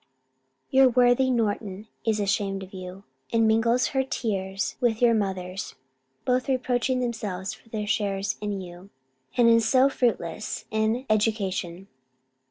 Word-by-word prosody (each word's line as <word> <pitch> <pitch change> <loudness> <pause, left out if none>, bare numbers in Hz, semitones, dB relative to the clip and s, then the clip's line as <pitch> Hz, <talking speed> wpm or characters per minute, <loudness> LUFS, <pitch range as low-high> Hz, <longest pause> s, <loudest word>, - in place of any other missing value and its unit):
Your 265 0 +6
worthy 245 +1 +4
Norton 210 -4 -1 0.2
is 220 -1 +2
ashamed 195 -1 -1
of 190 - -12
you, 185 +1 -8 0.3
and 225 -1 +3
mingles 230 +3 +3
her 265 -1 +1
tears 195 -6 -2
with 230 -3 +2
your 240 -1 +5
mother's; 190 -2 -3 0.5
both 255 +1 +1
reproaching 255 0 0
themselves 210 -5 -3
for 225 - -17
their 215 -2 -3
shares 205 -2 -1
in 205 -2 -3
you, 180 +1 -11 0.5
and 240 -1 +5
in 230 0 +6
so 260 +4 +4
fruitless 215 -5 -2
an 220 +4 0
education. 195 -4 -1
220 Hz, 135 wpm, -26 LUFS, 195-245 Hz, 0.5 s, Your